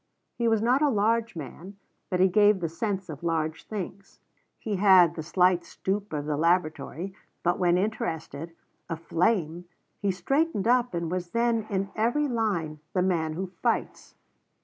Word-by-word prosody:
He 235 - -1
was 225 -1 +2
not 250 +4 +3
a 300 - +4
large 230 0 +1
man, 175 +5 -8 0.3
but 180 - 0
he 190 - +6
gave 205 +1 +4
the 165 -2 -2
sense 195 +2 -3
of 150 -4 -8
large 160 -2 -2
things. 195 -1 -7 0.4
He 210 -3 -3
had 185 -4 +6
the 165 - -5
slight 180 +2 +2
stoop 200 +4 -3
of 145 -2 -3
the 150 -1 -1
laboratory, 170 +2 0 0.3
but 175 0 +1
when 175 -1 +3
interested, 165 -5 -3 0.3
aflame, 170 +1 0 0.3
he 200 - 0
straightened 225 - 0
up 245 -4 +2
and 170 -1 -2
was 180 -1 -3
then 230 +1 +1
in 195 -1 -2
every 240 +7 +1
line 200 - -1
the 180 - +2
man 165 -4 0
who 185 +4 -3 0.2
fights. - - -2
185 Hz, 160 wpm, -27 LUFS, 170-215 Hz, 0.4 s, he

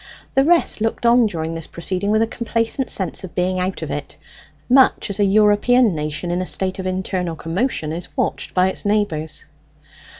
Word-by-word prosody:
The 270 - +4
rest 335 -7 +2
looked 225 +2 -1
on 235 -1 +5
during 165 -4 -4
this 165 -1 -6
proceeding 185 +3 -3
with 215 +1 +3
a - - +2
complacent 230 +3 -2
sense 190 0 -2
of 185 - -9
being 185 0 0
out 185 +1 -2
of - - -5
it, - - -6 0.5
much 260 -4 +4
as 200 - -5
a - - +4
European 210 +3 +4
nation 150 +2 -3
in 175 +1 -1
a - - -2
state 190 0 -1
of 185 - -3
internal 185 -2 -2
commotion 165 - -2
is 175 +2 -5
watched - - -2
by 185 0 +4
its - - -4
neighbours. 200 -7 -1
190 Hz, 190 wpm, -20 LUFS, 175-225 Hz, 0.5 s, on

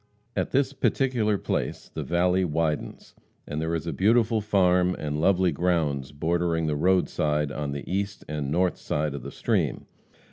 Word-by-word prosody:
At - - 0
this 135 0 +1
particular 120 -7 +1
place - - -3
the - - -3
valley 90 +2 +2
widens, 80 -2 -2 0.3
and 75 +1 -4
there 80 +1 -1
is 80 - -3
a 85 - -2
beautiful 110 +2 +3
farm 90 -3 +3
and 75 0 -3
lovely 95 0 +3
grounds 75 -5 0
bordering 80 +2 0
the 75 -1 0
roadside 75 -3 +1
on 75 -2 -3
the 70 0 -6
east 100 +2 -3
and 75 -2 -3
north 90 +3 +1
side 75 -1 -1
of 70 - -5
the - - -7
stream. - - -1
85 Hz, 165 wpm, -26 LUFS, 75-95 Hz, 0.3 s, beautiful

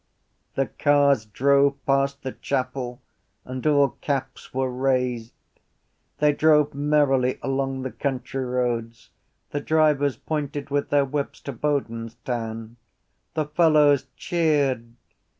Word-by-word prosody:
The 135 - +1
cars 140 -4 +2
drove 140 +5 +3
past 140 0 +1
the 130 - -3
chapel 130 -2 -3 0.4
and 130 +3 -4
all 145 -2 +4
caps 140 -2 -3
were 130 0 -1
raised. 125 -3 0 0.9
They 150 0 +3
drove 150 -1 +4
merrily 140 -3 +2
along 135 -1 -1
the 130 - -4
country 135 -1 -3
roads. 120 -2 -2 0.4
The 145 - -2
drivers 145 -4 +2
pointed 145 -1 -4
with 145 0 0
their 145 -1 +3
whips 140 +1 -3
to 140 - -6
Bodenstown. 115 -3 -3 0.6
The 155 - 0
fellows 150 -3 +4
cheered. 145 -9 0
135 Hz, 115 wpm, -24 LUFS, 125-145 Hz, 0.9 s, all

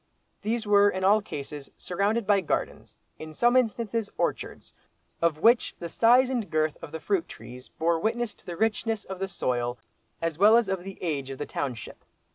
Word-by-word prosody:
These 225 +1 -2
were 205 0 +5
in 190 -1 -3
all 205 +3 +5
cases 145 -6 -7
surrounded 205 +5 -1
by 200 -1 +3
gardens, 170 - -3 0.2
in 155 0 -9
some 240 +6 +3
instances 230 -3 0
by - - -33
orchards, - - -3 0.5
of 165 -2 +2
which 230 +8 +3
the 170 - -6
size 245 +7 +5
and 235 -7 -2
girth 155 -1 0
of 150 - -9
the 160 - -5
fruit 190 -1 -1
trees 125 +3 -11
bore 165 0 0
witness 230 +3 -1
to - - -23
the 175 -1 -5
richness 220 0 0
of 190 -1 -7
the 195 - -2
soil 120 -8 -2 0.4
as 165 -1 -3
well 215 +3 +7
as 235 -3 +2
of 190 -2 -2
the 195 0 -8
age 140 -6 -2
of 135 - -6
the 145 - -4
township. 125 -6 -5
190 Hz, 195 wpm, -27 LUFS, 155-220 Hz, 0.5 s, well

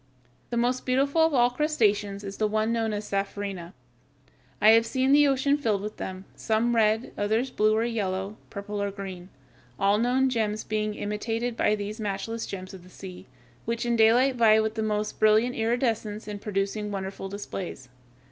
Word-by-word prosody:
The 235 - -2
most 245 +2 +1
beautiful 275 +5 +2
of 320 0 +4
all 245 -1 +4
crustaceans 210 -8 0
is 195 0 -7
the 215 - +1
one 215 +2 0
known 225 -1 0
as 210 0 -4
Sapphirina. 195 -3 -3 0.9
I 215 - +7
have 225 0 +6
seen 260 +2 +1
the 290 0 +6
ocean 280 +1 +2
filled 210 -7 0
with 210 +1 -6
them; 185 0 -6
some 230 +2 0
red, 220 +1 +2
others 220 +5 0
blue 215 -1 +2
or 220 - +1
yellow, 200 -3 -2
purple 205 0 -5
or 200 - 0
green, 190 -2 -8 0.5
all 200 +1 +3
known 250 +3 +2
gems 220 -4 -1
being 215 0 -2
imitated 225 +3 -3
by 215 - +2
these 210 +2 -5
matchless 215 +2 -3
gems 185 0 -7
of 190 - -10
the 180 - -16
sea, 185 -1 -10 0.4
which 230 +1 -2
in 240 0 +1
daylight 245 +4 +4
vie 220 -2 +6
with 220 0 0
the 220 - -3
most 210 -1 -2
brilliant 215 +3 +4
iridescence 225 -2 -1
in 205 -1 -5
producing 205 +1 -2
wonderful 195 -1 -5
displays. 190 -8 -6
215 Hz, 175 wpm, -26 LUFS, 200-235 Hz, 0.9 s, I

